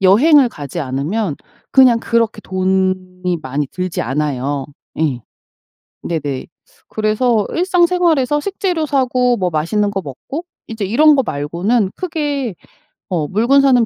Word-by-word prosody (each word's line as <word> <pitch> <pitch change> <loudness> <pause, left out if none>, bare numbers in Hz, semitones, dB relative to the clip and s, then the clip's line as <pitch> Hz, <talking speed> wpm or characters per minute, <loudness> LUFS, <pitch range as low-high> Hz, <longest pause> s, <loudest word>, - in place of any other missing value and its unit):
여행을 255 - +6
가지 150 - -6
않으면 145 +6 -2 0.3
그냥 255 -3 +6
그렇게 230 -2 0
돈이 185 -1 -1
많이 140 +3 -2
들지 185 -1 -3
않아요. 135 +1 -2 0.3
예. 145 -6 0 0.8
네네 145 -5 -3 0.4
그래서 215 0 +1
일상생활에서 345 -5 +2
식재료 360 -2 -1
사고 255 -3 +2
뭐 185 -4 -1
맛있는 190 +7 0
거 195 -1 -2
먹고 180 - -7 0.2
이제 220 -2 -4
이런 295 +10 +5
거 270 - +3
말고는 180 +8 0
크게 290 - -2 0.6
어 165 -6 -1
물건 235 - +3
사는 255 -4 +4
210 Hz, 265 characters per minute, -17 LUFS, 165-270 Hz, 0.8 s, 여행을